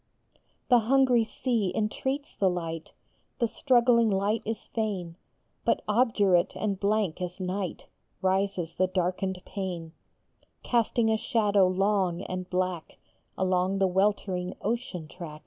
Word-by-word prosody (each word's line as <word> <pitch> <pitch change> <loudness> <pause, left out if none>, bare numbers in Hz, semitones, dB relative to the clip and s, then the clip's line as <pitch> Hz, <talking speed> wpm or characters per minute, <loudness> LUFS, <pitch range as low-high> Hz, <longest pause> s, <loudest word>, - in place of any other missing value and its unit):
The 245 -2 +7
hungry 250 0 +4
sea 230 -5 -1
entreats 265 +6 -2
the 195 - +2
light, 165 -2 -4 0.4
The 235 - +1
struggling 235 -1 +3
light 205 +3 +1
is 225 0 -4
fain, 195 -7 -2 0.5
But - - +1
obdurate 210 -6 +3
and 200 -3 -2
blank 200 -4 0
as 180 +1 -4
night 185 0 -3 0.3
Rises 190 -2 0
the 185 - +1
darkened 185 +1 -1
pane, 180 -5 -5 0.7
Casting 235 -1 +2
a 220 - +2
shadow 210 -4 +3
long 190 -1 +1
and 185 0 -5
black 180 -2 -2 0.4
Along 185 +1 +1
the 195 - +3
weltering 190 -1 0
ocean 205 -7 -3
track. 155 -2 -9
195 Hz, 125 wpm, -28 LUFS, 180-220 Hz, 0.7 s, The